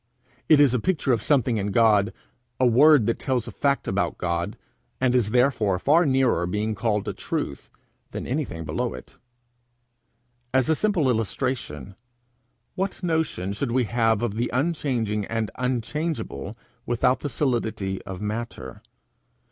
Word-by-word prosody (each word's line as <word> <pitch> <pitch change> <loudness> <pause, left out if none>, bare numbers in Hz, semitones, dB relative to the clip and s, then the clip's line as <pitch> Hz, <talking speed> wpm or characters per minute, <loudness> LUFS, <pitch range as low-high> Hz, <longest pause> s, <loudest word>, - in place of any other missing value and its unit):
It 155 - +7
is 140 -4 +5
a 125 - +2
picture 145 - +1
of 115 - 0
something 130 -5 +2
in 100 -1 -1
God, 105 -1 +4 0.5
a 130 - +4
word 135 +1 +6
that 115 - 0
tells 125 -4 -1
a - - -6
fact 140 -1 0
about - - -1
God, 85 -1 -2 0.4
and 125 -1 +2
is 120 -5 +2
therefore 115 -5 +2
far 155 - +3
nearer 130 -10 +2
being 105 +4 -1
called 105 -2 -1
a - - -2
truth - - -4 0.4
than - - -6
anything 125 - -3
below 65 - -2
it. 65 - -13 1.4
As 130 +2 +3
a 160 - +4
simple 190 -6 +1
illustration: 115 - -2 0.8
What 190 0 -3
notion 160 - -1
should 120 +5 -3
we 130 0 +3
have 115 -1 +1
of 115 -4 -1
the 120 +3 -1
unchanging 125 -8 -1
and 115 0 -2
unchangeable, 125 - -3 0.3
without 125 +2 +2
the 145 - -4
solidity 115 -7 -1
of 95 -1 -8
matter? 105 - -5
120 Hz, 150 wpm, -24 LUFS, 105-135 Hz, 1.4 s, It